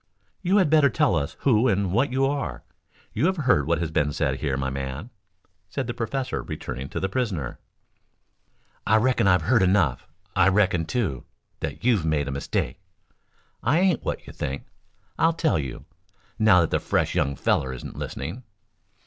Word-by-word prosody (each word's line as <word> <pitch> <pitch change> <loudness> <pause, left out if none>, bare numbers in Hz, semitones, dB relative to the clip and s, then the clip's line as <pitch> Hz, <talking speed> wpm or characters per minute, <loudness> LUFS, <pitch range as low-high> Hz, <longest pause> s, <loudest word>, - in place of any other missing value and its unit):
"You 190 +2 +2
had 180 -7 +3
better 155 -3 +6
tell 100 - +2
us 80 +1 -2
who 125 -2 +4
and 100 -4 +1
what 125 +8 +2
you 135 +1 +2
are. 140 +1 -2 0.5
You 135 +10 +2
have 190 0 0
heard 125 - +2
what 85 0 +2
has 80 -2 -3
been 75 -2 +1
said - - -1
here, 70 -3 -1
my 65 -1 -2
man," 70 - -5 0.6
said - - -3
the 120 - -3
professor 125 +3 -2
returning 65 +1 -6
to - - -3
the 95 - 0
prisoner. 95 - -2 1.3
"I 110 - +5
reckon 115 -2 +2
I've 90 -4 +4
heard 115 +6 +3
enough. 90 -9 +2 0.3
I 95 -1 +5
reckon, 95 -4 +3
too, 95 - -2 0.3
that - - -5
you've 115 -8 +3
made 80 -3 0
a - - -2
mistake. 70 +6 -2 0.8
I 155 +6 +2
ain't 180 -6 +2
what - - -3
you - - -10
think. 70 -1 -4 0.5
I'll 165 +1 +4
tell 160 - +1
you, 65 -4 -6 0.5
now 110 -5 +6
that 80 - 0
the - - +2
fresh - - 0
young 70 0 0
feller 65 0 +1
isn't 65 - -8
listening." 85 - -5
95 Hz, 175 wpm, -25 LUFS, -, 1.3 s, better